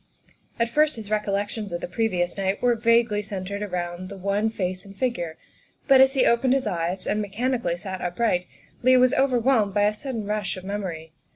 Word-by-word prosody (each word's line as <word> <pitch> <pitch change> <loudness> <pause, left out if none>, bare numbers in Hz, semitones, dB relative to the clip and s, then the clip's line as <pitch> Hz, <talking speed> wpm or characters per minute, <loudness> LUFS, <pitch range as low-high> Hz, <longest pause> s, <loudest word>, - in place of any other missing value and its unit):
At 230 - +2
first 300 +4 +3
his 215 -2 -8
recollections 205 0 -1
of 175 - -3
the - - -5
previous 180 -3 -1
night 195 0 -1
were 245 -1 +3
vaguely 230 -2 +2
centred 200 0 -5
about 180 -2 -4
the 200 +1 -9
one 200 +3 0
face 185 -4 -3
and 195 -1 -14
figure, 175 -11 -2 0.5
but 270 -2 +7
as 265 +1 +5
he 260 - +4
opened 255 +2 +3
his 270 -2 0
eyes 180 -1 -2
and 210 - 0
mechanically 210 -3 -1
sat 190 0 -6
upright 180 0 0 0.3
Leigh 255 +1 +5
was 255 +1 +4
overwhelmed 245 -6 +2
by 205 - +3
a 210 +1 +3
sudden 230 -1 -5
rush 210 -2 -2
of 185 - -9
memory. 180 -5 -5
205 Hz, 190 wpm, -24 LUFS, 185-235 Hz, 0.5 s, but